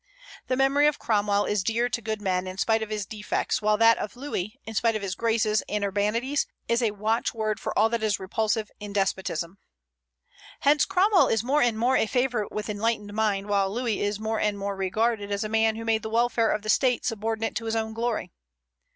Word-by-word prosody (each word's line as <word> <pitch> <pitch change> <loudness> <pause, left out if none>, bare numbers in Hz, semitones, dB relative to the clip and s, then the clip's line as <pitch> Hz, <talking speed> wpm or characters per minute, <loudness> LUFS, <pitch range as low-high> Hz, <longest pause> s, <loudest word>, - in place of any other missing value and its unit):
The 255 0 0
memory 275 +2 +4
of 300 - +1
Cromwell 205 -2 +1
is 205 -3 0
dear 230 +4 +1
to 235 -1 -3
good 220 -1 -4
men 185 -1 0
in 185 0 -7
spite 225 +3 +2
of 220 - -4
his 210 -2 -3
defects; 210 +2 -2
while 210 0 +2
that 230 +1 +5
of 210 - -5
Louis, 240 -7 -4
in 225 - -7
spite 225 +1 +1
of 215 - -3
his 190 -2 -2
graces 220 0 +1
and 210 0 -1
urbanities, 215 +8 0 0.2
is 235 +1 +1
a 230 - +2
watchword 215 +1 -1
for - - -4
all 220 - +5
that 230 0 -1
is 215 -3 0
repulsive 215 +3 -1
in 205 -1 -7
despotism. 190 -2 -2 1.0
Hence 290 +1 +4
Cromwell 385 +1 +4
is 225 -1 +1
more 280 +5 +2
and 235 -2 +2
more 245 +4 +2
a - - +1
favorite 245 -3 0
with 210 0 -4
enlightened 210 -1 -2
minds, 205 -2 0
while 200 -1 +1
Louis 235 -1 -1
is 205 0 -1
more 220 0 -2
and 210 -1 0
more 200 0 -3
regarded 205 +2 -1
as 200 +1 -1
a 215 - -4
man 220 0 +2
who 225 0 -6
made 225 -1 +1
the 220 - -5
welfare 230 0 +2
of 210 - -1
the 215 - -5
State 250 +2 +2
subordinate 225 -1 -2
to 230 - -5
his 225 0 -1
own 220 0 -2
glory. 230 -5 -2
220 Hz, 215 wpm, -26 LUFS, 205-230 Hz, 1.0 s, that